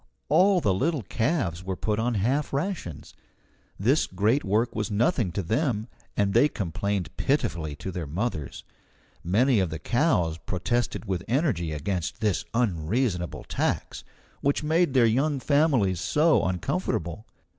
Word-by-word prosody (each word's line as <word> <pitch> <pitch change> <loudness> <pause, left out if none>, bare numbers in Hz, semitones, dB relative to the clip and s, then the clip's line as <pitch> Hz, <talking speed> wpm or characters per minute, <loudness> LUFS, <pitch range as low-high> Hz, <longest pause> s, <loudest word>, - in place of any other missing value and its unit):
All 190 -1 +4
the 100 -9 +2
little 140 - 0
calves 110 - -1
were 95 0 -3
put 105 +3 -1
on 120 +1 0
half 130 +10 0
rations. 145 - -4 0.7
This 130 +10 +2
great 105 +9 +1
work 110 +4 +1
was 105 0 -2
nothing 110 - +1
to 100 - -2
them, 110 - 0 0.3
and 100 -1 +2
they 120 +6 +5
complained 100 - -3
pitifully 85 - 0
to 95 - -6
their 85 -4 -4
mothers. 80 - -3 0.6
Many 115 +7 +3
of 95 -3 +1
the 80 - -4
cows 90 - +1
protested 110 +6 -2
with 95 -3 -2
energy 125 - 0
against 85 +6 -3
this 100 -6 0
unreasonable 95 -2 0
tax, - - -2 0.4
which 140 +2 +1
made 160 -2 +2
their 125 -3 +6
young 135 +6 +1
families 130 - +2
so 155 - +3
uncomfortable. 90 - -2
110 Hz, 140 wpm, -26 LUFS, 90-135 Hz, 0.7 s, their